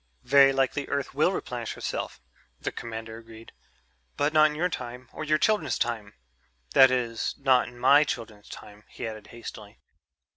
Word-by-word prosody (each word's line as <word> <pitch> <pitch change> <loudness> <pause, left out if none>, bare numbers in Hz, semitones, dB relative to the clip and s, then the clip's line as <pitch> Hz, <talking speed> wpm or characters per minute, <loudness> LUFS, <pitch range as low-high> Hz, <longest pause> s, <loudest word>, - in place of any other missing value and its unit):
"Very 135 +2 +6
likely 135 +1 0
Earth 140 -1 -3
will - - +3
replenish - - -4
herself," - - -5 0.4
the - - -3
commander 115 0 -7
agreed, 115 0 -14 0.7
"but 145 +2 +1
not 155 0 +6
in 150 - -6
your 175 +4 +1
time 125 -5 -7
or - - -6
your 155 0 +2
children's 160 - +1
time.... 110 -6 -3 0.6
That 130 0 +8
is, 120 -3 -1
not 130 -3 +3
in 120 0 -12
my 140 +4 +6
children's 115 -7 -6
time," 105 0 -12
he - - -7
added 110 -1 -8
hastily. 110 -3 -10
125 Hz, 160 wpm, -27 LUFS, 115-140 Hz, 0.7 s, That